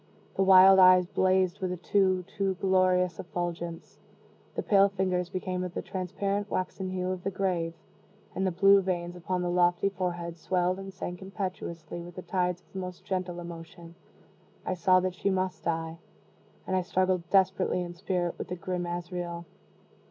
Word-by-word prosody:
The - - -1
wild 190 0 +8
eyes 185 -1 +7
blazed 185 +1 +1
with 185 -2 -2
a 180 - -3
too 185 0 +2
too 195 +1 -2
glorious 185 -1 +2
effulgence; 170 -1 -5 0.6
the - - -2
pale 200 -1 +5
fingers 185 -2 -1
became 185 -1 -3
of 180 -1 -6
the - - -3
transparent 195 +2 -3
waxen 185 +1 -3
hue 185 0 -2
of 185 -1 -4
the 195 - 0
grave; 180 -4 -1 0.6
and 190 - 0
the - - +3
blue 195 +3 +5
veins 175 -2 -3
upon 180 +1 -2
the 175 - -1
lofty 175 +2 +3
forehead 175 -3 -4
swelled 180 +1 0
and 195 0 -7
sank 180 -1 -6
impetuously 185 -4 -5
with 175 0 -10
the 185 - -7
tides 180 0 -1
of - - -31
the 190 - -4
most 180 -1 -7
gentle 185 -3 -3
emotion. 170 0 -10 0.7
I - - -1
saw 185 0 +4
that 185 0 -1
she 190 +2 -1
must 185 -1 -2
die 165 0 -2 0.7
and 185 - -1
I 185 - +2
struggled 185 -2 0
desperately 190 -1 +2
in 175 0 -7
spirit 175 -1 -2
with - - -4
the 180 - -4
grim 180 0 -3
Azrael. 175 0 -5
185 Hz, 175 wpm, -28 LUFS, 175-190 Hz, 0.7 s, wild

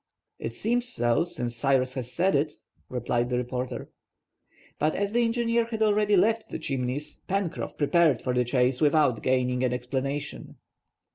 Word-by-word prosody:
"It 115 - -4
seems 240 - 0
so, 120 - +2
since 125 -9 -3
Cyrus 130 +1 +2
has 125 -2 -4
said 185 +6 +2
it," 145 +2 +1 0.4
replied 120 -1 -1
the 125 - 0
reporter. 125 +1 -4 0.9
But 155 - +1
as 200 +1 -1
the 240 0 +3
engineer 230 0 +1
had 225 -1 -1
already 210 -1 +3
left 225 +4 +2
the - - -4
Chimneys, 140 0 -3
Pencroff 195 -3 -2
prepared 155 -3 +3
for 125 - -2
the 125 0 +2
chase 125 +1 +1
without 145 -6 +3
gaining 125 -1 +1
an 125 -1 +1
explanation. 135 +3 -4
140 Hz, 155 wpm, -27 LUFS, 125-195 Hz, 0.9 s, the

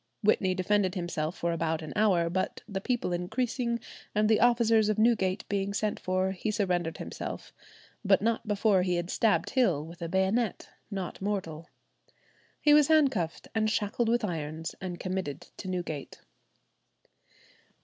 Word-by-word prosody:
Whitney 190 -3 +3
defended 190 0 +1
himself 170 -2 -3
for 170 - -1
about 160 -1 -1
an 155 - -7
hour, 190 -6 +3
but 185 +2 -2
the 195 -3 -4
people 240 -6 -1
increasing, 235 +6 -1 0.4
and 210 0 +3
the 220 0 +4
officers 230 -2 +4
of 215 - +1
Newgate 215 -4 +2
being 200 0 -1
sent 215 0 -1
for, 185 +1 0
he 190 +3 -3
surrendered 180 -6 0
himself, - - -6 0.5
but 195 -2 +4
not 225 +1 -1
before 205 -2 +3
he 180 -1 +1
had 175 +1 -2
stabbed 225 -2 +2
Hill 185 - +2
with 170 +1 -12
a 165 - -3
bayonet, 190 +4 0 0.2
"not 190 -4 -5
mortal." 180 -5 -3 0.9
He 295 - +5
was 295 -1 +6
handcuffed 270 - +2
and 215 -1 +1
shackled 220 +2 0
with 235 -1 +2
irons, 160 -3 -4
and 180 -2 -5
committed 185 -7 -3 0.2
to 190 - -7
Newgate. 175 -6 -4
195 Hz, 150 wpm, -29 LUFS, 175-220 Hz, 0.9 s, was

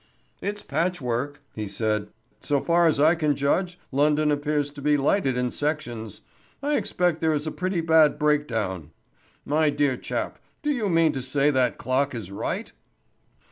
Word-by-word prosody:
"It's 205 +1 -4
patchwork," 145 -3 -2
he 105 -1 -4
said. 105 +1 -1 0.3
"So 145 -1 +1
far 170 +3 +3
as 155 -3 +2
I 155 +3 +6
can 155 -4 +1
judge, 175 +6 0
London 150 +2 +3
appears 145 0 0
to 145 0 -10
be 150 +1 +3
lighted 140 -2 +1
in 125 -1 0
sections. 125 -8 -3 0.4
I 295 +1 +1
expect 175 - 0
there 160 -1 +2
is 150 0 -2
a 155 - -2
pretty 185 -1 -1
bad 160 -2 +4
breakdown. 115 - 0 0.6
My 155 +1 +2
dear 145 -3 +1
chap, - - -4 0.2
do 295 - +1
you 230 -8 0
mean 165 -2 +4
to 135 - -3
say 140 +3 +1
that 130 -3 +1
clock 135 +1 0
is 105 -5 -6
right?" 100 - -3
145 Hz, 165 wpm, -25 LUFS, 130-160 Hz, 0.6 s, I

